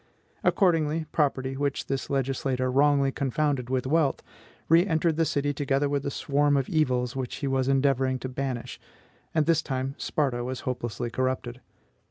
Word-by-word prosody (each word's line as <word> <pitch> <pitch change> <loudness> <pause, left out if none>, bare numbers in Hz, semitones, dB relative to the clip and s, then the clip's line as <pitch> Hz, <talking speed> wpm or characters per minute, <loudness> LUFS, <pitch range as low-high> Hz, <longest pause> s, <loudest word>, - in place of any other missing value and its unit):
Accordingly, 165 -4 +2
property, 135 -3 0
which 140 0 -1
this 135 -1 -3
legislator 130 -1 0
wrongly 140 0 +3
confounded 140 -2 -1
with 130 -1 0
wealth, 150 0 +1 0.4
reentered 165 -1 +3
the 165 +1 +2
city 145 -1 0
together 140 0 0
with 140 0 0
the 140 - -3
swarm 145 0 +1
of 135 - 0
evils 125 -6 0
which 130 -2 -3
he 140 - -3
was 135 -1 +1
endeavoring 135 -1 +2
to 130 - -5
banish; 130 -1 -4 0.6
and 155 -2 +3
this 165 -1 +3
time 130 0 -3
Sparta 130 -5 -1
was 130 +1 -4
hopelessly 120 -2 -3
corrupted. 130 -1 -2
135 Hz, 155 wpm, -27 LUFS, 130-145 Hz, 0.6 s, wrongly